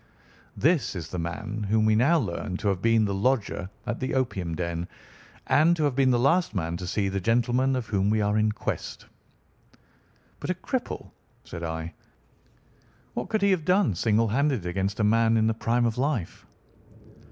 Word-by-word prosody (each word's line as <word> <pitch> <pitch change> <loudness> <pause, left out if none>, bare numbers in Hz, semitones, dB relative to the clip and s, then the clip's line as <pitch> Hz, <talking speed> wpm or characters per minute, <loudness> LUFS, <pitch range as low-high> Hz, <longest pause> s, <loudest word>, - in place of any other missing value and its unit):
This 155 - +2
is 85 -3 -6
the 90 - -4
man 105 +6 -4
whom 110 0 +3
we 110 - +4
now 140 +10 +4
learn 95 - -3
to 105 0 -1
have 95 -2 -1
been 115 -1 +3
the 100 - -1
lodger 100 -3 0 0.2
at 120 - -3
the 130 - -2
opium 95 -10 -1
den, 85 0 -3 0.6
and 155 +6 +4
to 160 - -1
have 145 -4 +1
been 135 -1 +3
the 125 - +3
last 140 +2 +2
man 85 -2 -2
to 90 0 -6
see 100 +2 0
the 95 0 -1
gentleman 120 +5 +2
of 125 -2 -2
whom 100 -1 0
we 110 +1 +2
are 105 0 +1
in 110 0 +2
quest." - - -5 1.3
"But - - -6
a - - +1
cripple!" - - -4 0.3
said 85 - -8
I. 80 0 -4 1.2
"What - - -4
could 215 -2 0
he 200 - +4
have 180 -4 +1
done 185 - +3
single 110 +4 +1
handed 135 - +1
against 95 +4 -2
a - - +2
man 115 +1 +3
in 110 - +2
the 110 - +2
prime 120 +2 0
of 115 +1 -1
life?" 130 - -2
110 Hz, 185 wpm, -26 LUFS, 95-130 Hz, 1.3 s, we